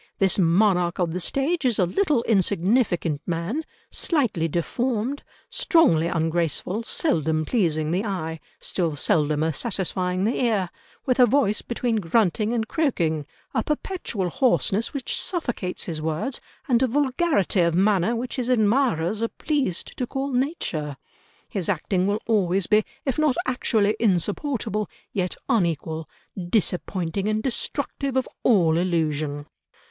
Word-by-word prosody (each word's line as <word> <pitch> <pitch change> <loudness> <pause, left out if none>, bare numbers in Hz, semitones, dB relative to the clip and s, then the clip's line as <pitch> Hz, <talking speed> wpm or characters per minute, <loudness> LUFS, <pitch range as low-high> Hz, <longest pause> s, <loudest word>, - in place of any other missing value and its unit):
This 195 0 +2
monarch 180 0 +3
of 175 -3 0
the 180 - -2
stage 275 - 0
is 245 -4 +2
a 185 - +4
little 290 - +1
insignificant 190 - +1
man, 175 - -2 0.3
slightly 240 - +1
deformed, 235 - -1 0.3
strongly 170 - +4
ungraceful, 170 +4 0
seldom 160 - 0
pleasing 155 -9 +1
the 185 +4 0
eye, 165 -6 -3 0.2
still 165 -5 -1
seldomer 155 +2 +1
satisfying 185 - -1
the 230 +4 +1
ear—with 230 - -2
a 250 - +8
voice 215 -4 +2
between 235 -1 -1
grunting 210 +2 +1
and 225 -2 -1
croaking, 165 - 0 0.3
a - - +2
perpetual 285 - -2
hoarseness 235 -5 +1
which 275 -3 -2
suffocates 245 - -2
his 160 -3 -4
words, 160 - -2 0.3
and 240 -2 +3
a 260 - +4
vulgarity 265 - +1
of 170 -1 +2
manner 195 +3 +3
which 245 +3 -4
his 250 -1 -1
admirers 220 - +2
are 230 - +2
pleased 270 - -2
to 250 - -1
call 270 +2 -3
nature... 185 - -2 0.5
his 195 -2 -3
acting 185 +1 0
will 205 +2 -1
always 195 -4 +2
be, 215 +3 +4 0.2
if 270 +1 -1
not 305 -4 +3
actually 220 -6 +1
insupportable, 210 - 0 0.2
yet 185 -2 -1
unequal, 165 -5 0 0.4
disappointing 185 -2 -1
and 215 0 0
destructive 275 +1 -2
of 260 - +1
all 170 -8 +4
illusion." 155 -4 -1
200 Hz, 130 wpm, -24 LUFS, 170-245 Hz, 0.5 s, a